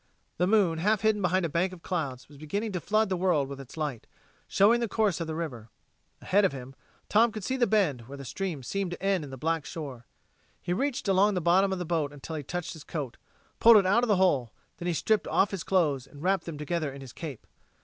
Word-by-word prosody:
The 180 - +2
moon, 190 -6 +3
half 210 +4 +2
hidden 215 -1 +2
behind 180 0 +2
a - - +1
bank 170 +4 0
of 175 -2 -12
clouds, 140 -9 -3
was 145 -1 -15
beginning 200 +9 -3
to 185 - -2
flood 215 +4 +2
the 185 - 0
world 175 -6 +1
with 140 0 -8
its 135 +3 -13
light, 145 -7 -3 0.4
showing 220 +5 +4
the 235 - 0
course 205 -5 +1
of 165 - -3
the 160 - -3
river. 125 -10 -5 0.5
Ahead 205 +2 +3
of 190 - +2
him, 130 0 -8 0.3
Tom 225 +2 +4
could 215 -2 -7
see 260 - -1
the 245 -2 +2
bend, 150 - +1
where 140 +1 -8
the 140 - -8
stream 165 0 -4
seemed 195 +7 -2
to 175 +2 -7
end 195 -4 +1
in 145 - -8
the 135 - -8
black 160 +3 -1
shore. 135 -8 -7 0.5
He 175 - -2
reached 260 +3 -1
along 195 +1 +4
the - - +1
bottom 180 +3 +3
of 190 - -1
the 180 - -4
boat 160 -4 -1
until 145 +3 -7
he 155 - -3
touched 175 +4 -4
his 160 - -11
coat, 140 -7 -5 0.4
pulled 230 -1 +8
it 200 - +4
out 205 +6 +3
of - - +2
the 210 - +4
hole; 145 -11 +2 0.3
then 175 - -5
he 175 - +1
stripped 215 +5 +1
off 200 - +2
his 195 -5 -4
clothes 150 -9 +1
and 145 +2 -13
wrapped 190 -2 +1
them 165 -3 -6
together 150 0 -2
in 135 0 -10
his 130 -3 -10
cape. 150 -8 -7
175 Hz, 250 wpm, -28 LUFS, 145-195 Hz, 0.5 s, pulled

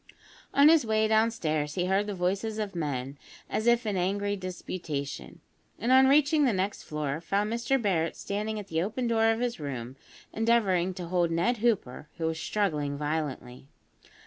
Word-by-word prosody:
On 280 +1 +6
his 320 -2 +6
way 220 -1 +2
downstairs, 170 -10 +1
he 180 -1 0
heard 195 +3 +1
the 205 - -3
voices 195 +5 -1
of 210 -2 -3
men 140 -4 -4 0.3
as 220 - -2
if 240 0 +4
in 210 -2 -1
angry 200 +3 0
disputation; 175 -6 -6 0.4
and 240 - -1
on 265 +1 +7
reaching 295 +2 +4
the 260 - +3
next 190 +2 -2
floor, 150 0 -3
found 205 +5 -1
Mr 235 +3 +1
Barret 175 -7 0
standing 210 +2 -3
at 210 - -5
the 160 0 0
open 220 +7 -2
door 225 -1 +3
of 225 0 +1
his 245 -5 -2
room, 130 -4 -5 0.4
endeavouring 200 -6 +2
to 180 - -5
hold 175 0 +1
Ned 175 +9 +1
Hooper, 205 - -1
who 165 - -2
was 160 0 -1
struggling 150 -10 -1
violently. 145 -4 -4
195 Hz, 170 wpm, -28 LUFS, 160-225 Hz, 0.4 s, on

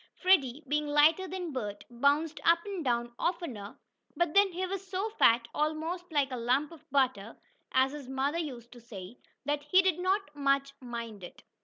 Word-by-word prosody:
Freddie, 310 -7 +3
being 300 +2 0
lighter 305 +5 +4
than 360 -2 -5
Bert, 210 -6 -5
bounced 285 +6 +1
up 335 0 +4
and 390 -5 -4
down 240 -2 -1
oftener, 280 - -3 0.4
but 345 -2 +1
then 400 -1 +5
he 365 +2 -2
was 385 +1 -5
so 390 +4 -2
fat, 235 - +4
almost 320 +4 -2
"like 285 -3 +1
a 255 - -3
lump 255 +6 +1
of 330 - -15
butter," 250 -6 0 0.3
as 260 +1 +3
his 285 -3 -8
mother 275 +5 -1
used 245 -7 -6
to 245 - -12
say, 220 -1 -10 0.3
that 290 +1 0
he 370 +6 +4
did 370 -3 +1
not 375 -4 0
much 275 -1 +1
mind 235 -5 -7
it. 175 - -11
290 Hz, 180 wpm, -30 LUFS, 245-345 Hz, 0.4 s, then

